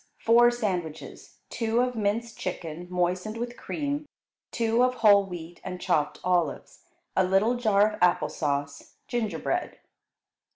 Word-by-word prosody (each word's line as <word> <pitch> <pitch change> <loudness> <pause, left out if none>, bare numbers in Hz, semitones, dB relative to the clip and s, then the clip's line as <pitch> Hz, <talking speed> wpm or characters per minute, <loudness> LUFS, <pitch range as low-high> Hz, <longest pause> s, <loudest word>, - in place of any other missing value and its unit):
Four 240 +1 +5
sandwiches, 185 -10 -4
two 230 0 0
of 250 0 0
minced 225 +2 -1
chicken 175 -1 -5
moistened 180 +4 -1
with 240 +1 -4
cream, 290 +2 -4 0.4
two 230 0 +1
of 255 0 +2
whole 200 -2 +7
wheat 175 -1 -9
and 180 -1 -6
chopped 155 -5 0
olives; 175 -4 -1 0.4
a 190 - +4
little 195 +6 +3
jar 215 -4 +3
of - - -9
apple 180 -1 +3
sauce; 140 -2 -3
gingerbread. 230 -4 -2
200 Hz, 130 wpm, -27 LUFS, 180-235 Hz, 0.4 s, whole